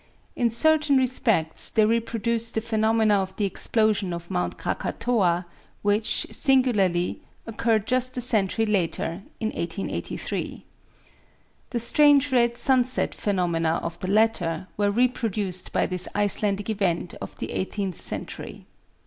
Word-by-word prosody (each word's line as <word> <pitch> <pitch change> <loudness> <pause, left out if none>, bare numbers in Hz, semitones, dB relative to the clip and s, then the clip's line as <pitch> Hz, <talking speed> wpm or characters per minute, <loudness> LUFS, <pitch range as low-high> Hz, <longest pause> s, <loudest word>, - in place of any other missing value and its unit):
In 240 -1 +1
certain 305 +4 +3
respects 230 -11 +1
they 220 -2 +3
reproduced 230 +1 0
the 220 - 0
phenomena 220 -2 +2
of 190 0 -6
the 210 - -1
explosion 205 -1 0
of 170 0 -8
Mount 90 0 -2
Krakatoa, 185 -8 -1 0.4
which, 205 +2 +1
singularly, 210 -10 +2 0.2
occurred 225 -1 0
just 255 +1 +1
a - - 0
century 225 -2 +3
later, 180 -3 -1 0.2
in 220 - -1
1883. 170 -1 -4 1.0
The 245 - -3
strange 285 +3 +4
red 235 -2 +2
sunset 255 -1 +2
phenomena 170 -5 -1
of 170 0 -5
the 185 - -4
latter 195 -5 +1
were 205 -1 +1
reproduced 215 -5 0
by - - +1
this 180 -1 -1
Icelandic 205 0 +1
event 180 -5 -1
of - - -8
the - - -6
eighteenth 190 -1 -3
century. - - -4
215 Hz, 125 wpm, -24 LUFS, 185-235 Hz, 1.0 s, strange